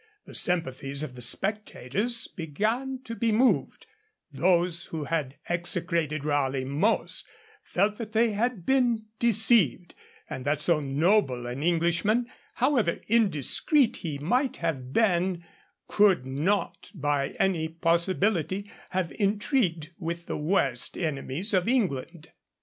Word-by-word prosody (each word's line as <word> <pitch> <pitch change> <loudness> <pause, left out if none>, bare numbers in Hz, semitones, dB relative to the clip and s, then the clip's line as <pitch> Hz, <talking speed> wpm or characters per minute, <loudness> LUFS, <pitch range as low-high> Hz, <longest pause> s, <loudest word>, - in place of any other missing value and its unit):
The - - -12
sympathies 140 -4 -1
of 135 - -6
the 125 - -9
spectators 210 - -1
began 220 - -2
to 230 - -6
be 230 +1 0
moved; 245 +4 +2 0.5
those 170 +2 +1
who 160 -2 -5
had 145 -3 -2
execrated 170 -3 -1
Raleigh 135 -3 0
most 150 +12 0 0.3
felt 205 +3 0
that 220 -3 -6
they 225 +1 +3
had 215 -3 -1
been 245 -5 +2
deceived, 220 - +3 0.3
and 130 - -6
that 145 +2 0
so 160 +1 +2
noble 140 - +1
an 125 +3 -5
Englishman, 175 +8 +2 0.3
however 245 -9 +1
indiscreet 225 - +2
he 155 -4 -4
might 245 - 0
have 135 -7 -3
been, 180 -2 +1 0.4
could 195 -10 +3
not 155 +10 -1
by 145 -3 -1
any 175 -5 +1
possibility 180 +3 0 0.2
have 185 -3 -1
intrigued 200 - 0
with 170 -1 -4
the - - -4
worst 165 +6 0
enemies 155 +4 -3
of 185 +1 +2
England. 170 - -1
175 Hz, 120 wpm, -27 LUFS, 150-215 Hz, 0.5 s, they